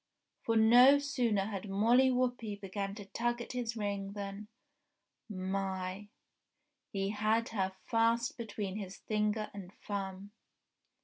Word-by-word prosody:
For 230 Hz, -, 0 dB
no 245 Hz, +5 st, +8 dB
sooner 245 Hz, -8 st, 0 dB
had 200 Hz, -1 st, -5 dB
Molly 235 Hz, +7 st, +4 dB
Whuppie 245 Hz, -5 st, -1 dB
began 195 Hz, 0 st, -4 dB
to 205 Hz, -2 st, -8 dB
tug 240 Hz, +4 st, -1 dB
at 235 Hz, -, -6 dB
his 240 Hz, -2 st, -3 dB
ring 200 Hz, -2 st, -3 dB
than... 200 Hz, 0 st, -6 dB, 0.8 s
My!... 190 Hz, 0 st, -3 dB, 0.8 s
He 195 Hz, -1 st, -1 dB
had 215 Hz, +2 st, +1 dB
her 190 Hz, -3 st, -1 dB
fast 230 Hz, +1 st, +2 dB
between 210 Hz, -4 st, -4 dB
his 195 Hz, -2 st, -6 dB
finger 210 Hz, 0 st, -1 dB
and 190 Hz, -3 st, -8 dB
thumb. 195 Hz, -1 st, -4 dB
210 Hz, 125 wpm, -33 LUFS, 195-230 Hz, 0.8 s, no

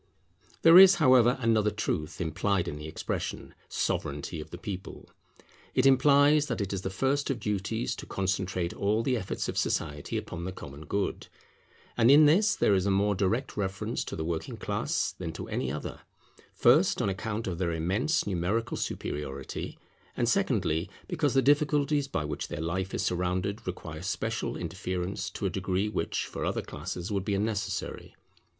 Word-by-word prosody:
There 165 Hz, +2 st, +10 dB
is, 190 Hz, 0 st, +9 dB
however, 130 Hz, -5 st, +5 dB
another 110 Hz, -2 st, +3 dB
truth 95 Hz, -5 st, -3 dB
implied 90 Hz, +2 st, 0 dB
in 75 Hz, -, -4 dB
the 75 Hz, +1 st, -7 dB
expression, 80 Hz, -, -4 dB, 0.2 s
Sovereignity 75 Hz, +3 st, -2 dB
of -, -, -10 dB
the -, -, -8 dB
people. 95 Hz, -2 st, -7 dB, 0.6 s
It 130 Hz, -, +3 dB
implies 145 Hz, +2 st, +5 dB
that 115 Hz, -, -2 dB
it 100 Hz, -1 st, -2 dB
is 95 Hz, -, -2 dB
the 95 Hz, -, -3 dB
first 135 Hz, +8 st, 0 dB
of 135 Hz, -4 st, -1 dB
duties 105 Hz, +3 st, -2 dB
to -, -, -8 dB
concentrate 95 Hz, -2 st, -1 dB
all 105 Hz, +3 st, 0 dB
the 130 Hz, 0 st, +1 dB
efforts 95 Hz, -5 st, -3 dB
of -, -, -1 dB
society 75 Hz, -2 st, -2 dB
upon 85 Hz, -1 st, -5 dB
the 95 Hz, -, -3 dB
common 75 Hz, -4 st, -10 dB
good. 100 Hz, 0 st, -2 dB, 0.7 s
And 115 Hz, 0 st, +4 dB
in 150 Hz, +2 st, +8 dB
this 200 Hz, +8 st, +4 dB
there -, -, +3 dB
is 95 Hz, 0 st, +2 dB
a -, -, +3 dB
more 100 Hz, +1 st, +2 dB
direct 100 Hz, +7 st, -1 dB
reference 100 Hz, -1 st, -2 dB
to -, -, -5 dB
the 80 Hz, -, -3 dB
working 80 Hz, -1 st, -3 dB
class -, -, -1 dB
than -, -, -6 dB
to -, -, -6 dB
any 65 Hz, -, -2 dB
other; 75 Hz, -, -5 dB, 0.5 s
first, 150 Hz, +10 st, +4 dB
on 120 Hz, -, +1 dB
account 105 Hz, +3 st, -3 dB
of 90 Hz, -3 st, -3 dB
their 90 Hz, -2 st, 0 dB
immense 100 Hz, -, 0 dB
numerical 105 Hz, +5 st, -1 dB
superiority, 70 Hz, -2 st, -4 dB, 0.4 s
and, -, -, +1 dB
secondly, 80 Hz, +4 st, +1 dB, 0.2 s
because 150 Hz, -6 st, 0 dB
the 135 Hz, -, +4 dB
difficulties 145 Hz, 0 st, +2 dB
by 75 Hz, -, -2 dB
which 75 Hz, -1 st, -4 dB
their -, -, -5 dB
life 95 Hz, +4 st, -2 dB
is -, -, -1 dB
surrounded 90 Hz, +4 st, -1 dB
require 80 Hz, -3 st, -6 dB
special 95 Hz, -, -2 dB
interference 90 Hz, +2 st, -3 dB
to 105 Hz, -, -5 dB
a 95 Hz, -, +1 dB
degree 95 Hz, +2 st, -1 dB
which -, -, -2 dB
for -, -, -6 dB
other -, -, -1 dB
classes 90 Hz, +5 st, -6 dB
would 100 Hz, -2 st, 0 dB
be 100 Hz, 0 st, 0 dB
unnecessary. 105 Hz, +1 st, -3 dB
100 Hz, 170 wpm, -29 LUFS, 90-125 Hz, 0.7 s, There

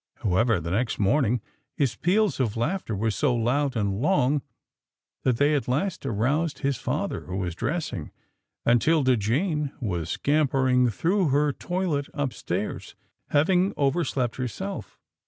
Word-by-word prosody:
However, 110 Hz, +2 st, +2 dB
the 85 Hz, +1 st, -5 dB
next 115 Hz, +5 st, 0 dB
morning, 120 Hz, +2 st, +2 dB, 0.4 s
his 130 Hz, -6 st, +1 dB
peals 200 Hz, -, +1 dB
of 115 Hz, -4 st, 0 dB
laughter 120 Hz, -, -1 dB
were 110 Hz, +3 st, 0 dB
so 130 Hz, +3 st, +1 dB
loud 130 Hz, +4 st, +1 dB
and 100 Hz, -1 st, -1 dB
long 145 Hz, -4 st, +2 dB, 0.8 s
that 125 Hz, -3 st, +1 dB
they 145 Hz, +3 st, +3 dB
at 145 Hz, -, 0 dB
last 145 Hz, +4 st, -1 dB
aroused 140 Hz, +8 st, 0 dB
his 140 Hz, -3 st, +1 dB
father -, -, -3 dB
who 95 Hz, +1 st, -4 dB
was 90 Hz, -3 st, -2 dB
dressing, 145 Hz, -, -3 dB, 0.6 s
and 120 Hz, 0 st, +4 dB
'Tilda 150 Hz, -6 st, +3 dB
Jane 150 Hz, -, 0 dB
who 125 Hz, -, -4 dB
was 85 Hz, -3 st, -2 dB
scampering 130 Hz, -, +2 dB
through 180 Hz, -, +1 dB
her 145 Hz, +1 st, +2 dB
toilet 175 Hz, -5 st, -2 dB
upstairs, 140 Hz, -6 st, -3 dB, 0.3 s
having 180 Hz, +6 st, +2 dB
over 145 Hz, +4 st, +2 dB
slept 125 Hz, -4 st, -2 dB
herself. 130 Hz, -, -5 dB
135 Hz, 145 wpm, -26 LUFS, 115-155 Hz, 0.8 s, and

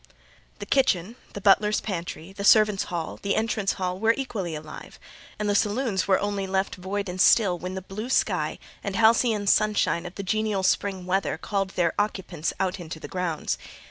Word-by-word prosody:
The -, -, -7 dB
kitchen, 225 Hz, -6 st, +1 dB, 0.2 s
the 200 Hz, -, -6 dB
butler's 210 Hz, +2 st, +4 dB
pantry, 175 Hz, -2 st, -5 dB
the 200 Hz, -, -6 dB
servants' 210 Hz, -1 st, +5 dB
hall, 170 Hz, -2 st, -4 dB
the 200 Hz, -, 0 dB
entrance 220 Hz, -3 st, 0 dB
hall, 185 Hz, -1 st, -3 dB
were 225 Hz, +2 st, +3 dB
equally 200 Hz, -11 st, -3 dB
alive; 155 Hz, 0 st, -9 dB, 0.4 s
and 210 Hz, -, -2 dB
the 205 Hz, -, +2 dB
saloons 210 Hz, 0 st, 0 dB
were 190 Hz, -1 st, +4 dB
only 200 Hz, -1 st, -2 dB
left 190 Hz, +1 st, 0 dB
void 200 Hz, +2 st, -4 dB
and 180 Hz, 0 st, -2 dB
still 200 Hz, -5 st, +5 dB
when 185 Hz, +2 st, -5 dB
the 190 Hz, -, -5 dB
blue 210 Hz, +6 st, -6 dB
sky -, -, +1 dB, 0.3 s
and 200 Hz, -2 st, -3 dB
halcyon 220 Hz, -1 st, +3 dB
sunshine 205 Hz, -4 st, +2 dB
of 175 Hz, -, -11 dB
the 200 Hz, -, -5 dB
genial 215 Hz, 0 st, 0 dB
spring 190 Hz, -1 st, 0 dB
weather 190 Hz, +1 st, 0 dB
called 195 Hz, -2 st, -2 dB
their 170 Hz, -2 st, +2 dB
occupants 190 Hz, -6 st, -2 dB
out 190 Hz, 0 st, -1 dB
into 160 Hz, -2 st, -7 dB
the -, -, -8 dB
grounds. 180 Hz, -4 st, -2 dB
195 Hz, 180 wpm, -25 LUFS, 180-210 Hz, 0.4 s, servants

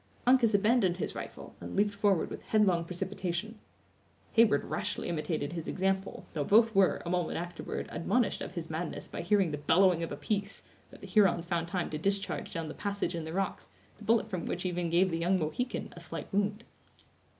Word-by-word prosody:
Uncas 245 Hz, -4 st, +5 dB
abandoned 200 Hz, -3 st, +3 dB
his -, -, -3 dB
rifle, -, -, -8 dB
and -, -, -6 dB
leaped 205 Hz, +1 st, +2 dB
forward 200 Hz, -3 st, +2 dB
with -, -, -6 dB
headlong 190 Hz, -6 st, +3 dB
precipitation. 185 Hz, +4 st, -4 dB, 0.7 s
Heyward 225 Hz, -11 st, +4 dB
rashly 155 Hz, -, -3 dB
imitated 155 Hz, -2 st, -2 dB
his 165 Hz, -2 st, -5 dB
example, 190 Hz, +1 st, -1 dB
though 150 Hz, -4 st, -1 dB
both 220 Hz, +7 st, +5 dB
were, 195 Hz, -2 st, +3 dB
a -, -, -3 dB
moment 180 Hz, -2 st, 0 dB
afterward, 175 Hz, 0 st, -4 dB
admonished 240 Hz, +6 st, 0 dB
of -, -, -6 dB
his 165 Hz, -2 st, -4 dB
madness 160 Hz, +1 st, -4 dB
by -, -, -5 dB
hearing 195 Hz, -2 st, +2 dB
the 145 Hz, -, -3 dB
bellowing 175 Hz, +3 st, +4 dB
of 165 Hz, -, -3 dB
a -, -, -4 dB
piece, 200 Hz, -1 st, -2 dB, 0.3 s
that -, -, -15 dB
the -, -, -8 dB
Hurons 190 Hz, -5 st, +4 dB
found 170 Hz, -1 st, -1 dB
time 180 Hz, 0 st, -2 dB
to 155 Hz, -, -3 dB
discharge 195 Hz, +3 st, -1 dB
down 165 Hz, -3 st, -3 dB
the 150 Hz, -, -6 dB
passage 200 Hz, -3 st, -2 dB
in 165 Hz, -2 st, -4 dB
the 160 Hz, -, -5 dB
rocks, 195 Hz, -, -2 dB, 0.3 s
the -, -, -13 dB
bullet 225 Hz, +2 st, +3 dB
from 185 Hz, -5 st, -4 dB
which 180 Hz, -, -3 dB
even 175 Hz, -1 st, -1 dB
gave 180 Hz, +2 st, +3 dB
the 165 Hz, -, -1 dB
young 180 Hz, +3 st, +2 dB
Mohican 175 Hz, +10 st, -3 dB
a -, -, -9 dB
slight -, -, -6 dB
wound. 205 Hz, +2 st, 0 dB
185 Hz, 195 wpm, -31 LUFS, 170-205 Hz, 0.7 s, Uncas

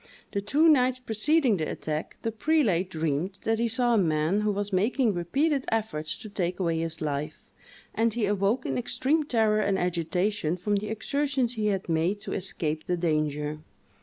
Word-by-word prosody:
The 200 Hz, -, -1 dB
two 285 Hz, +11 st, +3 dB
nights 255 Hz, -5 st, +4 dB
preceding 255 Hz, +1 st, +2 dB
the 155 Hz, -2 st, -2 dB
attack, 155 Hz, 0 st, -4 dB
the 225 Hz, -, -1 dB
prelate 215 Hz, -, +1 dB
dreamed 165 Hz, +3 st, -2 dB
that 225 Hz, 0 st, +1 dB
he 235 Hz, -, +2 dB
saw 240 Hz, +1 st, +1 dB
a 225 Hz, -, +4 dB
man 160 Hz, +3 st, +1 dB
who 210 Hz, 0 st, +1 dB
was 205 Hz, 0 st, -3 dB
making 220 Hz, +4 st, +2 dB
repeated 270 Hz, -, 0 dB
efforts 210 Hz, -9 st, -2 dB
to -, -, -9 dB
take 180 Hz, -3 st, -2 dB
away 165 Hz, -3 st, 0 dB
his 165 Hz, -1 st, -4 dB
life, 145 Hz, -1 st, -3 dB, 0.5 s
and 230 Hz, +1 st, +2 dB
he 225 Hz, -1 st, 0 dB
awoke 205 Hz, +5 st, +1 dB
in -, -, -1 dB
extreme 290 Hz, +5 st, 0 dB
terror 220 Hz, -5 st, +2 dB
and 200 Hz, -2 st, +1 dB
agitation 180 Hz, 0 st, 0 dB
from 205 Hz, +3 st, 0 dB
the 210 Hz, +1 st, -4 dB
exertions 265 Hz, +2 st, -1 dB
he 215 Hz, -3 st, -1 dB
had 195 Hz, -2 st, -1 dB
made 170 Hz, +5 st, +1 dB
to -, -, -5 dB
escape 160 Hz, -5 st, -2 dB
the 180 Hz, -, 0 dB
danger. 155 Hz, -2 st, -1 dB
205 Hz, 180 wpm, -27 LUFS, 170-235 Hz, 0.5 s, nights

